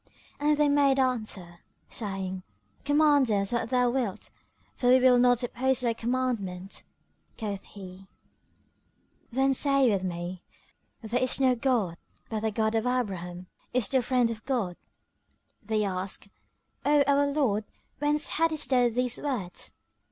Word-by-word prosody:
And 295 +1 +2
they 295 0 +3
made 285 -1 +3
answer, 215 -9 -2 0.3
saying, 190 -3 -4 0.4
"Command 290 -2 +4
us 200 -2 +1
what 235 -1 -1
thou 250 -1 +2
wilt, 240 -7 -3 0.4
for 245 - -1
we 255 +1 +7
will 250 -1 +5
not 245 0 +4
oppose 255 +1 0
thy 235 -2 +1
commandment." 225 -6 -3 0.6
Quoth 205 -3 -4
he, 190 -1 -12 1.2
"Then 270 +2 +2
say 275 -2 +3
with 195 -2 0
me:—There 185 +6 -6
is 255 +1 +2
no 260 -2 +4
god 230 -9 0 0.3
but 220 - -1
the 220 +1 -1
God 220 +1 0
and 225 +2 0
Abraham 185 -8 -3 0.3
is 245 -5 +2
the 260 -1 +2
Friend 245 -1 +1
of 220 -1 -7
God!" 230 -10 -1 0.9
They 215 0 -1
asked, 190 +1 -3 0.5
"O 290 0 +4
our 285 +1 +3
lord, 265 -8 +1 0.4
whence 295 +1 +1
haddest 315 -4 +1
thou 250 -2 +4
these 250 +1 0
words?" 225 -11 -4
245 Hz, 135 wpm, -28 LUFS, 200-265 Hz, 1.2 s, we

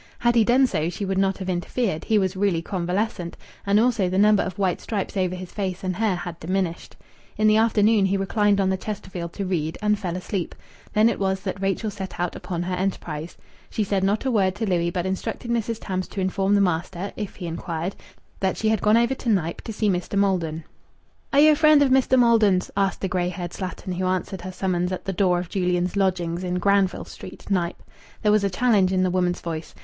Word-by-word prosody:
Had 240 0 +2
he 230 -2 +5
done 250 +4 +4
so 160 -9 -1
she 195 +3 -4
would 190 0 0
not 195 0 +1
have 190 - -6
interfered; 180 0 -2
he 220 - +3
was 190 -1 +1
really 190 -4 +1
convalescent, 180 0 -2 0.3
and 200 +1 +4
also 225 -5 +2
the 185 - -1
number 210 +1 +5
of 185 -1 -4
white 190 -3 0
stripes 205 -3 -3
over 185 -2 0
his 180 -1 -8
face 190 -3 -3
and 185 -1 -1
hair 210 -1 +1
had 175 -1 -6
diminished. 180 0 -2 0.4
In 215 - +2
the 215 0 +5
afternoon 215 -2 +4
he 195 +1 +1
reclined 205 +1 +2
on 190 -1 +2
the 190 - 0
Chesterfield 185 -4 -6
to 200 - -3
read, 165 -4 -2
and 210 -1 +1
fell 180 -3 -3
asleep. 185 -1 -4 0.4
Then 215 +1 +5
it 230 - 0
was 190 -1 0
that 195 -1 -4
Rachel 195 +3 -1
set 195 -2 -7
out 175 -1 -1
upon 175 -1 -4
her 180 +1 -3
enterprise. 175 -4 -3 0.3
She 215 - -1
said 195 -1 0
not 205 +5 +1
a 260 - +1
word 195 -4 +2
to 220 - -2
Louis, 170 -2 +1
but 175 +1 -2
instructed 190 +5 -3
Mrs. 230 -1 -1
Tams 185 -2 -3
to - - -7
inform 190 +1 +1
the 200 - +4
master, 180 +1 -1
if 210 -3 -5
he 180 - -7
inquired, 170 +1 -4 0.4
that 190 -1 0
she 220 - +1
had 220 -3 +1
gone 210 +2 +4
over 235 +2 +3
to 260 -2 -4
Knype 170 -6 0
to 225 - -6
see 215 0 -1
Mr. 185 +1 -1
Maldon. 170 -5 0 0.7
"Are 285 - +5
you 310 +1 +8
a - - +4
friend 305 -1 +6
of 270 - +2
Mester 260 0 +4
Maldon's?" 225 -6 +4
asked 195 -1 0
the 190 - 0
grey 180 -1 0
haired 175 -2 -5
slattern 185 0 -5
who 185 - 0
answered 185 0 -2
her 185 +1 -6
summons 180 -1 -1
at 185 - -4
the 195 - -2
door 180 -1 +2
of 175 0 -3
Julian's 180 -1 0
lodgings 180 -3 0
in 180 0 -2
Granville 195 0 +2
Street, - - -11
Knype. 175 -2 -1 0.4
There 210 - +4
was 210 -1 +3
a 200 - +2
challenge 200 -2 +3
in 185 -1 +2
the 185 - +1
woman's 180 -1 0
voice. 165 -1 -6
190 Hz, 225 wpm, -24 LUFS, 180-210 Hz, 0.7 s, you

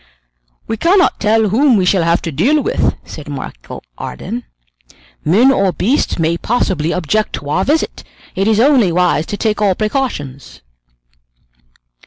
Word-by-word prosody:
"We 225 - -3
cannot 365 - +2
tell 220 0 +2
whom 250 +3 +3
we 185 - +1
shall 180 0 +2
have 170 +1 +1
to 165 - -3
deal 250 - +2
with," 455 - 0
said 150 -2 -10
Michel 130 - -8 0.2
Ardan. 235 +5 -6 0.8
"Men 220 - +4
or 195 -7 +2
beasts 235 +11 0
may 165 0 0
possibly 185 -9 -1
object 185 +5 -1
to 145 - -6
our 185 +5 +1
visit. 305 +7 -1 0.3
It 195 +2 -1
is 220 -1 +3
only 250 -7 +4
wise 170 -3 +1
to 205 - -4
take 215 -1 -1
all 200 -3 +2
precautions." 195 - -4
200 Hz, 150 wpm, -16 LUFS, 170-240 Hz, 0.8 s, Men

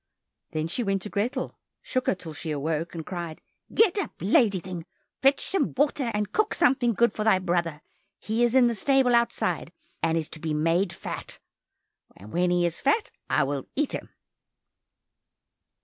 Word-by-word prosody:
Then 155 0 -2
she 175 - -2
went 195 -3 0
to 210 - -6
Grethel, 215 +6 -2 0.2
shook 255 -1 -2
her - - +3
till 165 -3 -8
she 155 - -6
awoke, 155 +3 -2
and 160 -2 -5
cried, 170 -3 -5 0.3
"Get 420 -3 +4
up, - - -2
lazy 225 - +3
thing, 175 -1 -7 0.3
fetch 270 +1 +4
some 375 -8 0
water, 280 -3 +2
and 210 -1 -1
cook 430 +1 +1
something 250 -6 +3
good 235 -1 +3
for 215 - -2
thy 215 -3 +5
brother, 170 -4 -1 0.3
he 225 +3 0
is 240 +1 +2
in 260 -2 +7
the 235 - +2
stable 265 +3 +3
outside, 235 0 +1 0.3
and 165 0 +2
is 160 -2 -1
to 160 - -8
be 155 -1 -2
made 165 +4 +2
fat. 170 - -7 0.8
When 170 - 0
he 175 0 +2
is 170 -1 -2
fat, 425 +11 +1 0.2
I 155 - +3
will 135 -1 -3
eat 290 0 +1
him." - - -5
190 Hz, 175 wpm, -26 LUFS, 165-250 Hz, 0.8 s, in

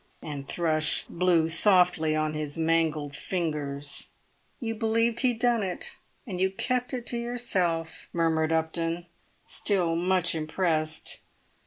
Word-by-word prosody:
and 140 -3 -6
Thrush 155 -3 +2
blew 170 -2 +2
softly 175 -3 +4
on 155 0 0
his 150 0 -4
mangled 160 -3 +1
fingers. 145 -6 -2 0.5
"You 225 -3 -2
believed 230 +1 +1
he'd 245 -2 +2
done 240 -1 +2
it, 185 -3 -4 0.3
and 185 -6 -4
you 190 - +3
kept 250 +5 -1
it 250 -3 -4
to 240 - -1
yourself," 185 -9 -2
murmured 160 -2 +1
Mr. 160 - +3
Upton, 165 +1 -2 0.4
still 180 -5 +1
much 180 0 +2
impressed. 160 0 -1
170 Hz, 130 wpm, -27 LUFS, 155-200 Hz, 0.5 s, softly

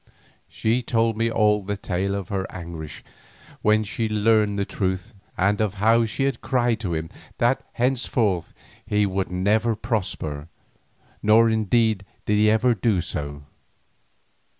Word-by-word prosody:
She 115 +3 0
told 115 -2 +1
me 115 +1 +1
all 105 -2 +2
the 100 +1 -4
tale 100 0 -2
of 100 -2 -5
her 95 -2 -3
anguish 80 -5 -8 0.6
when 110 0 +3
she 110 +1 -3
learned 105 -1 +2
the 100 - 0
truth, 95 -3 -3 0.2
and 100 +3 +2
of 105 -2 0
how 115 +3 +3
she 125 +5 -2
had 135 -4 -1
cried 120 -3 +1
to 90 -7 -2
him 80 0 -4 0.3
that 120 +3 +2 0.2
thenceforth 120 -7 0 0.3
he 105 -1 +1
would 95 -1 -2
never 105 +5 +1
prosper. 95 - -3 0.7
Nor 115 +2 +5
indeed 110 -1 +2 0.2
did 105 - +2 0.3
he 125 -1 +5
do 110 -6 +2
so. 70 -3 -5
105 Hz, 140 wpm, -24 LUFS, 95-115 Hz, 0.7 s, Nor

